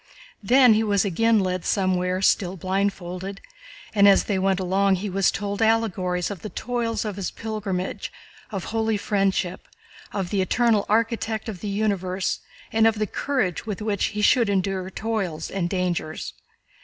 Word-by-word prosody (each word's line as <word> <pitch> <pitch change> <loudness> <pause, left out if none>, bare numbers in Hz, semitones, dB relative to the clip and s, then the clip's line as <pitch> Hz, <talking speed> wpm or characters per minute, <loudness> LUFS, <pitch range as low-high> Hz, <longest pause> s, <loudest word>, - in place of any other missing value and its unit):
Then 245 +3 +6
he 215 - +3
was 205 -2 +2
again 225 +4 +3
led 185 -2 -1
somewhere 185 -1 0
still 185 -1 +2
blindfolded, 190 0 -2 0.5
and 200 -2 +6
as 195 - +6
they 200 -3 -1
went 190 0 +1
along 190 +1 +2
he 195 +2 -4
was 195 0 +3
told 200 +1 -3
allegories 195 -5 +1
of 195 - -7
the 215 - -6
toils 230 -2 -2
of 205 -2 -4
his 190 -3 -2
pilgrimage, 205 -4 -4 0.4
of 195 -4 -4
holy 225 -1 0
friendship, 195 -3 -1 0.4
of 190 -3 -3
the 200 - +1
Eternal 220 +1 +2
Architect 225 0 0
of 205 -5 -5
the 205 - -4
universe, 195 -3 -1 0.3
and 225 0 +5
of 225 - +2
the 215 - 0
courage 220 - -2
with 205 -3 -3
which 210 -2 0
he 210 -1 -2
should 235 0 +4
endure 190 -1 -1
toils 195 -7 -3
and 180 -3 -1
dangers. 175 -4 -2
200 Hz, 160 wpm, -24 LUFS, 185-220 Hz, 0.5 s, Then